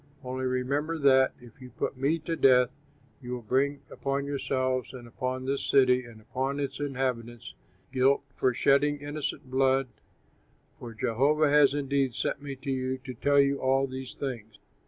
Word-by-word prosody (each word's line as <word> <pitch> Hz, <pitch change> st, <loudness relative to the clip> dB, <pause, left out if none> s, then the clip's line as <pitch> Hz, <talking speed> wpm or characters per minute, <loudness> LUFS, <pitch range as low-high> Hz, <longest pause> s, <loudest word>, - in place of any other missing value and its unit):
Only 130 Hz, +1 st, -4 dB
remember 140 Hz, +6 st, -1 dB
that, 130 Hz, -3 st, +4 dB
if 120 Hz, +1 st, -17 dB
you 125 Hz, -, -10 dB
put 125 Hz, -, -3 dB
me 140 Hz, +5 st, +1 dB
to 165 Hz, +1 st, -3 dB
death, 125 Hz, -4 st, +5 dB, 0.5 s
you 125 Hz, -1 st, -6 dB
will 125 Hz, -1 st, -5 dB
bring 140 Hz, +5 st, 0 dB
upon 140 Hz, 0 st, -2 dB
yourselves 130 Hz, -2 st, -1 dB
and 120 Hz, -2 st, -10 dB
upon 130 Hz, +2 st, -4 dB
this 135 Hz, +1 st, -1 dB
city 130 Hz, -2 st, +4 dB
and 115 Hz, -2 st, -13 dB
upon 135 Hz, +5 st, -3 dB
its 140 Hz, -1 st, -3 dB
inhabitants 125 Hz, -4 st, -3 dB, 0.4 s
guilt 135 Hz, +2 st, +3 dB
for 130 Hz, -, +2 dB
shedding 145 Hz, +4 st, +3 dB
innocent 145 Hz, -2 st, -5 dB
blood, 135 Hz, 0 st, +2 dB, 0.9 s
for 115 Hz, -2 st, -9 dB
Jehovah 140 Hz, +7 st, +2 dB
has 145 Hz, -2 st, +5 dB
indeed 140 Hz, -3 st, 0 dB
sent -, -, -2 dB
me 140 Hz, -1 st, -6 dB
to 135 Hz, +1 st, -5 dB
you 130 Hz, 0 st, -1 dB
to 130 Hz, 0 st, -8 dB
tell 140 Hz, +4 st, +2 dB
you 140 Hz, 0 st, +3 dB
all 135 Hz, +1 st, +2 dB
these 130 Hz, -1 st, -7 dB
things." 115 Hz, -6 st, -6 dB
130 Hz, 165 wpm, -28 LUFS, 125-140 Hz, 0.9 s, death